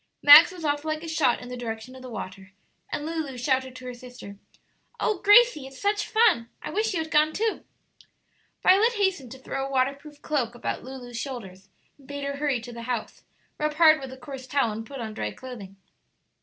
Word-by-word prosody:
Max 295 +3 +10
was 350 -3 -8
off 290 0 0
like 310 0 -3
a - - -6
shot 315 -7 +2
in 245 - -9
the 250 - -5
direction 235 +1 -6
of 260 - -11
the 255 - -9
water, 195 -3 -8 0.4
and 295 - -3
Lulu 315 -5 -4
shouted 260 0 -1
to 255 0 -10
her 250 - -5
sister, 245 -5 -11 0.6
"Oh 420 -4 0
Gracie, 415 - +5
it's 270 -1 -13
such 410 +1 0
fun! 435 - +3
I - - -7
wish 435 -1 0
you 325 - 0
had 320 - -12
gone, 305 +1 +3
too." 445 +1 -1 1.0
Violet 425 +6 +5
hastened 380 - -1
to - - -11
throw 270 +1 -4
a - - -8
waterproof 275 +3 -2
cloak 255 -6 -1
about 240 - -4
Lulu's 250 -2 -8
shoulders, 195 -8 -7 0.3
and 270 - -19
bade 285 0 -6
her 280 0 -3
hurry 280 -4 0
to 240 +1 -9
the 235 - -8
house, 240 -3 -4 0.4
rub 300 0 -1
hard 315 -1 +6
with 265 -1 -7
a 260 - -10
coarse 260 0 -9
towel, 265 -4 +1
and 220 +1 -6
put 275 -3 -7
on 220 -1 -5
dry - - -3
clothing. 225 -7 -10
270 Hz, 210 wpm, -26 LUFS, 245-310 Hz, 1.0 s, Max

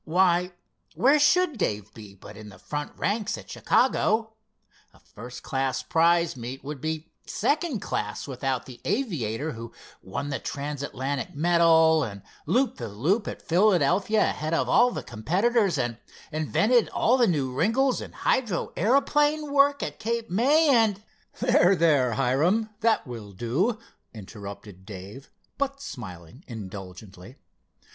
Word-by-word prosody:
Why, 180 +1 +2 0.4
where 280 +4 +4
should 315 -2 +3
Dave 105 - -2
be 105 -3 -12
but 100 +2 -13
in 105 0 -10
the 95 - -14
front 145 +9 -5
ranks 210 0 -1
at - - -11
Chicago? 220 +1 +1 0.6
A - - -20
first 125 +3 -11
class 135 -1 -2
prize 170 -1 +2
meet 125 +2 -7
would 140 -1 -7
be 160 0 -4 0.2
second 300 - -1
class 105 +6 -3
without 130 -1 -2
the 125 -2 -12
aviator 160 - -2
who 115 -2 -8 0.3
won 140 +10 -5
the 140 - -2
trans 145 -1 -5
Atlantic 135 -1 -4
medal, 160 -1 +4
and 100 -5 -7 0.2
looped 255 0 +1
the 120 - -4
loop 155 - 0
at - - -6
Philadelphia 185 +3 +3
ahead 155 +2 -1
of - - 0
all 245 +1 +5
the - - -5
competitors, 190 - +1
and 120 -3 -2 0.3
invented 210 +10 +2
all 245 - +2
the 245 -3 +3
new 140 -7 0
wrinkles 230 - +1
in - - -8
hydro 225 -9 -1
aeroplane 290 - +2
work 285 0 +4
at - - -5
Cape 230 0 -3
May, 285 - +4
and——" 215 -3 +2 0.4
"There, 215 -6 +4
there, 145 -8 +3
Hiram—that 205 - +1
will 115 -5 -8
do," 140 - 0 0.4
interrupted 100 -2 -10
Dave, 100 +6 -10 0.3
but 275 0 -1
smiling 105 - -9
indulgently. 95 -1 -9
160 Hz, 140 wpm, -26 LUFS, -, 0.6 s, all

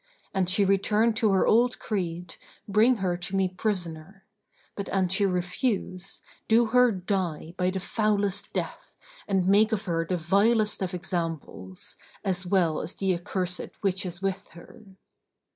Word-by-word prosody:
An 190 -2 +1
she 195 +2 +3
return 210 +4 +2
to 220 -2 +2
her 190 - +3
old 240 +3 +3
creed, 175 -4 -4 0.3
bring 215 +5 +4
her 185 -5 -1
to 180 +2 -4
me 190 -1 +2
prisoner; 185 -1 -4 0.5
but 200 - -5
an 190 -2 +1
she 195 +2 +3
refuse, 185 +1 -2 0.2
do 230 +1 +5
her 250 -1 +6
die 180 -4 -3
by 180 0 +1
the 190 +1 -2
foulest 205 0 0
death - - -5 0.3
and 190 -2 +1
make 210 +3 +4
of 215 -1 -1
her 165 -3 0
the 180 +2 -2
vilest 210 +6 +2
of 185 -1 -2
examples, 165 - -5 0.3
as 185 -1 -1
well 175 -5 +2
as 170 - -5
the 195 -1 0
accursed 180 +1 -3
which 195 -2 0
is 180 0 -6
with 195 0 -2
her." 225 +7 -14
190 Hz, 155 wpm, -27 LUFS, 180-205 Hz, 0.5 s, her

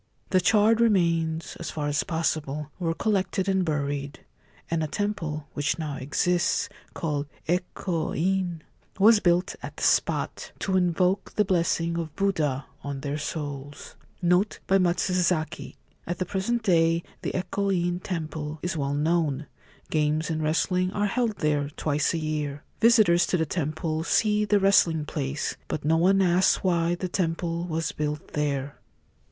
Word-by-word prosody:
The 185 - +4
charred 215 +4 +4
remains 170 -7 +1
(as 170 - -5
far 150 -2 -3
as 145 0 +1
possible) 150 -3 -2
were 165 -2 -1
collected 190 -1 0
and 190 -1 +2
buried, 145 -3 -2 0.5
and 165 -1 +1
a - - -1
temple 165 -6 -3
(which 145 0 0
now 150 -4 -4
exists), 175 +9 +1 0.3
called 150 -4 -2 0.2
4 175 +2 +2
Eko 175 -2 -3
In,' 180 -2 0 0.3
was 215 +2 +6
built 175 -1 +2
at - - -8
the - - -5
spot, - - +1
to 190 - -1
invoke 180 +1 +1
the 210 - +3
blessing 170 -2 +1
of 160 -3 -5
Buddha 155 -9 0 0.2
on 140 -1 -4
their 145 +1 -3
souls. 145 -2 -6 0.3
NOTE 180 +4 +2
BY 195 0 +3
MATSUZAKI. 180 -2 0 0.2
— - - -36
At 175 +1 -2
the 185 - -1
present 205 +6 -1
day 165 -3 +3 0.2
the - - -3
Eko 200 +2 -1
In 175 -1 0
Temple 160 -4 -4
is 175 0 -1
well 140 -2 -1
known. 155 -2 +1 0.5
Games 155 +1 +1
and 155 0 -1
wrestling 180 +4 +1
are 205 - 0
held 230 +1 0
there 145 -2 0
twice 150 0 0
a - - 0
year. 150 -2 -3 0.2
Visitors 215 -7 +5
to 180 - +1
the 160 - +1
temple 155 0 -2
see 210 +3 +2
the 205 -1 +3
wrestling 170 -5 +4
place; 145 -1 -3
but 150 - -4
no 160 +2 +3
one 190 +3 +4
asks 180 +1 +3
why 170 -2 +2
the 185 +1 -3
temple 170 -1 -1
was 165 -1 -2
built 150 0 -3
there. 140 -2 -2
165 Hz, 160 wpm, -26 LUFS, 150-185 Hz, 0.5 s, was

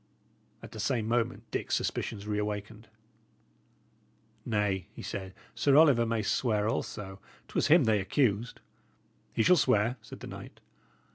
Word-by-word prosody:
At - - -10
the 110 - -9
same 110 0 0
moment 115 -1 0
Dick's - - -1
suspicions 105 -2 -3
reawakened. 105 +1 -4 1.6
"Nay," 105 -5 0
he - - -8
said, 95 -1 -6 0.2
"Sir 140 -1 +3
Oliver 140 -7 +6
may 115 -1 0
swear 105 -1 +1
also. 95 -3 -4 0.3
'Twas - - 0
him 155 +1 +6
they 110 -3 +3
accused." 110 +3 0 0.7
"He 110 - +1
shall 180 +7 +6
swear," 125 -3 +2
said 110 - -12
the - - -7
knight. - - -10
110 Hz, 135 wpm, -30 LUFS, 105-120 Hz, 1.6 s, Oliver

